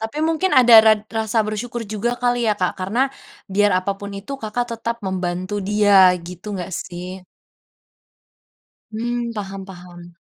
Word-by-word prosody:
Tapi 225 +7 -5
mungkin 330 +4 0
ada 240 -2 +7
rad 215 -1 +5 0.2
rasa 220 +1 0
bersyukur 230 +3 -4
juga 215 +3 -1
kali 245 0 +2
ya, 215 - +3
Kak, 180 -2 0
karena, 195 +6 -3 0.5
biar 205 +1 +3
apapun 200 +2 -4
itu 205 +8 -8
Kakak 220 +3 -2
tetap 230 +1 -3
membantu 185 +1 -3
dia, 205 0 +3 0.3
gitu 180 +3 -10
nggak, 180 -1 -5 0.2
sih? 180 +1 -8 1.7
Mmm, 235 +1 -3
paham 195 -2 -6
paham. 175 -2 -13
205 Hz, 140 wpm, -21 LUFS, 185-230 Hz, 1.7 s, ada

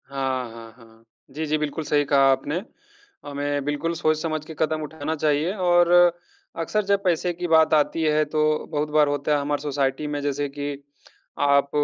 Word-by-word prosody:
हाँ, 130 -2 -2
हाँ, 115 0 -11
हाँ। 115 -1 -19 0.3
जी, 155 +4 -4
जी, 155 0 0
बिल्कुल 150 +1 -3
सही 145 -1 +1
कहा 135 -1 +4
आपने। 145 +6 -1 0.6
हमें 145 0 -3
बिल्कुल 145 +3 -1
सोच-समझ 155 -1 -1
के 160 - -9
कदम 155 0 0
उठाना 155 +1 -4
चाहिए 155 +3 0
और 175 -3 +3 0.7
अक्सर 210 +6 0
जब 200 0 +1
पैसे 180 -1 +1
की 175 +1 -4
बात 160 -1 +4
आती 155 +2 +2
है 155 0 +3
तो 155 +1 -1 0.3
बहुत 150 0 -1
बार 150 -1 +4
होता 145 +1 0
है 145 - 0
हमारे 145 +1 -2
सोसाइटी 140 0 -1
में 145 0 -3
जैसे 145 0 -1
कि 145 +1 -4 0.7
आप 140 0 +3
150 Hz, 175 wpm, -23 LUFS, 145-160 Hz, 0.7 s, कहा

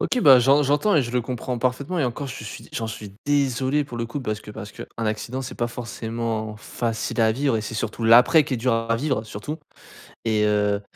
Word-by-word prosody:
OK, 250 - 0
bah, 135 -4 +8
j'en 135 +4 +5
j'entends 145 +9 +2
et 150 - +5
je 120 - -5
le 125 0 +1
comprends 125 +1 -4
parfaitement 135 +8 -1
et 145 - +2
encore, 135 +3 -3
je 125 -4 -7
suis 110 - -9
j'en 115 - -2
suis 105 -2 -8
désolé, 140 0 +2
pour 120 - -8
le 115 - -2
coup, 140 +5 -5
parce 110 -3 -3
que 105 - -10
parce 105 -2 -8
qu'un - - -8
accident, 115 +4 -2
c'est 125 - -7
pas 120 - 0
forcément 115 -2 -4
facile 115 +2 -3
à 110 0 +4
vivre 135 -1 +1
et - - -1
c'est 110 +2 -6
surtout 115 +1 -3
l'après 125 +7 +7
qui 135 - -2
est - - -1
dur 125 +2 +1
à 115 0 +1
vivre 130 -4 -1
surtout 110 +9 -6 0.7
et 110 -2 +2
heu 105 -1 +2
120 Hz, 230 wpm, -24 LUFS, 110-135 Hz, 0.7 s, bah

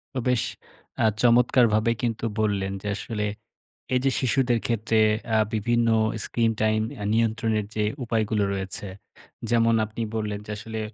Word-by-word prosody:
তো - - 0
বেশ 125 -3 +2 0.6
আ - - +5 0.2
চমৎকারভাবেই 115 -2 +4
কিন্তু 115 -1 -1
বললেন 100 -3 0
যে 105 - -6
আসলে 105 0 -4 0.7
এই 125 - +4
যে 135 - +4
শিশুদের 125 -2 +2
ক্ষেত্রে 115 -1 0 0.4
আ - - +5 0.2
বিভিন্ন 120 +2 +1 0.4
স্ক্রিন-টাইম 110 -2 +1
অ্যা 105 -5 -6
নিয়ন্ত্রণের 110 -1 +1
যে 105 - +1 0.2
উপায়গুলো 110 -2 0
রয়েছে। 95 +1 -3 0.6
যেমন 115 -1 +3
আপনি 110 +2 -7
বললেন 105 -2 -2
যে 105 - -7
আসলে 110 +1 -6
110 Hz, 135 wpm, -25 LUFS, 105-120 Hz, 0.7 s, আ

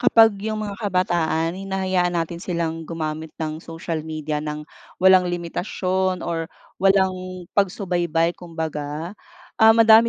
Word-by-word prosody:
kapag 225 -2 +6
yung 215 0 -2
mga 200 0 -6
kabataan 170 -5 +1
hinahayaan 190 -2 0
natin 170 0 -2
silang 165 -3 -3
gumamit 160 -1 -3
ng 155 0 -4
social 165 -1 -4
media 155 -1 -3
nang 150 0 -5 0.3
walang 185 -1 +6
limitasyon 185 +2 -1
or 165 -1 -2 0.3
walang 185 -2 +2
pagsubaybay 175 -4 +1
kumbaga. 160 -1 -5 0.5
Ah, 220 0 +8
madami 225 0 +7
175 Hz, 120 wpm, -23 LUFS, 160-190 Hz, 0.5 s, Ah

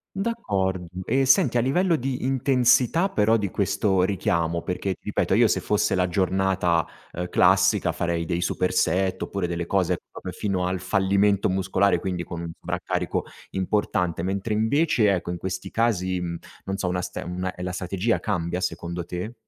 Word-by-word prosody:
D'accord 100 - -1 0.3
e 135 0 +2
senti, 130 -2 +4
a - - +4
livello 170 +8 +2
di 130 -2 -3
intensità 130 +5 +3
però 110 - +3
di 100 -3 -2
questo 95 -1 +1
richiamo, 85 -4 0
perché 95 +2 -2
ti - - -41
ripeto, - - 0
io - - +5
se - - 0
fosse - - +1
la 90 -1 +1
giornata, 95 -2 +1 0.3
ehm, 90 +1 -4
classica - - +3
farei 85 -1 -1
dei 85 +1 -1
super 90 +1 0
set 95 +3 +1
oppure 100 -3 -2
delle 85 0 -3
cose 90 -2 +1
proprio 90 - -7
fino 95 -1 -1
al 90 -1 -2
fallimento 100 +2 +2
muscolare, 95 -1 +1
quindi 90 -2 -3
con 85 0 -6
un 85 -1 -5
sovraccarico - - -2 0.3
importante, 90 -3 0
mentre 100 +4 -2
invece 110 -1 +3
ecco, 85 -1 -2
in 90 - -4
questi 95 +1 -5
casi, 95 -6 +1
mhmm, 85 -1 -3 0.3
non 95 - -2
so, 95 -2 -1
una 90 0 -1
ste - - -5
una 90 +1 -4
e 90 - -7
la 90 - -2
strategia 95 +5 -1
cambia 90 -3 -2
secondo 85 -1 -3
te? 90 +7 -5
95 Hz, 175 wpm, -25 LUFS, 90-105 Hz, 0.3 s, io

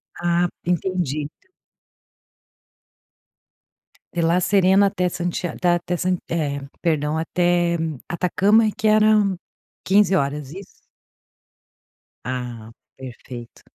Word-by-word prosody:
Ah, 175 0 +1 0.2
entendi. 175 -5 -1 2.9
De 170 - -1
La 170 +2 +3
Serena 195 +1 +4
até 185 -2 0
Santia 175 0 -2
da 175 - +4
até 175 +1 -3
San 185 0 +2 0.2
eh, 145 -4 -1 0.3
perdão 150 -2 +1
até, 175 +1 +1
hum, 160 -5 -3
Atacama 195 +6 +3
e - - 0
que 220 - -2
eram 215 -3 +4 0.5
15 195 -1 +4
horas, 140 -2 -2
isso? 195 0 -9 1.6
Ah, 120 -3 -5 0.3
perfeito. 125 -2 -10
175 Hz, 100 wpm, -22 LUFS, 150-190 Hz, 2.9 s, Serena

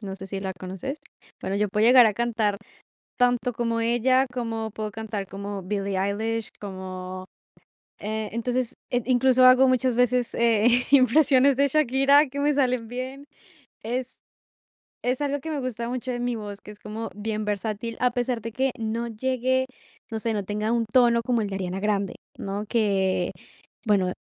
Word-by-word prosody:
No 195 -3 -6
sé 190 0 -9
si 195 0 -5
la 190 -1 -3
conoces. 190 - -5 0.4
Bueno, 195 - -2
yo 210 0 +1
puedo 210 +3 +2
llegar 245 -1 +8
a 215 - +2
cantar 225 -4 0 0.6
tanto 245 0 +2
como 230 0 -1
ella, 245 +3 +3
como 225 -3 -3
puedo 215 0 -5
cantar 215 -2 -5
como 200 +1 -6
Billie 195 0 -2
Eilish, 220 +3 -1
como 185 -1 -7 0.7
eh, 215 +1 -3
entonces, 245 +1 -1 0.2
eh, 245 0 +1
incluso 255 0 +4
hago 255 +1 +7
muchas 255 -1 +2
veces, 250 0 +2
eh, 230 -1 +3 0.2
impresiones 270 0 +5
de 280 +1 +4
Shakira 280 +1 +4
que 280 +2 -5
me 295 0 +2
salen 255 -4 +1
bien. 260 +3 -6 0.6
Es 250 +3 -4 0.8
es 250 +3 -1
algo 285 0 0
que 320 - -7
me 295 -3 -2
gusta 235 -2 -4
mucho 255 +1 -3
de 245 - -3
mi 245 0 -1
voz, 205 -2 -7
que 210 - -11
es 210 - -14
como 215 +2 -6
bien 215 0 -3
versátil, 210 +2 -3
a 250 -1 +3
pesar 245 -1 -1
de 230 +2 -5
que 265 +3 0
no 230 +1 -2
llegue, 260 +3 0 0.5
no 220 - -2
sé, 225 +1 -1
no 205 -2 -1
tenga 210 +3 -1
un 235 -1 +2
tono 240 -1 +4
como 240 0 +1
el 210 - -2
de 195 - -5
Ariana 190 0 -3
Grande, 200 -2 -1 0.2
¿no? 200 +2 -4
Que, 195 -5 +1 0.5
bueno, 195 -4 +2
230 Hz, 175 wpm, -25 LUFS, 205-255 Hz, 0.8 s, llegar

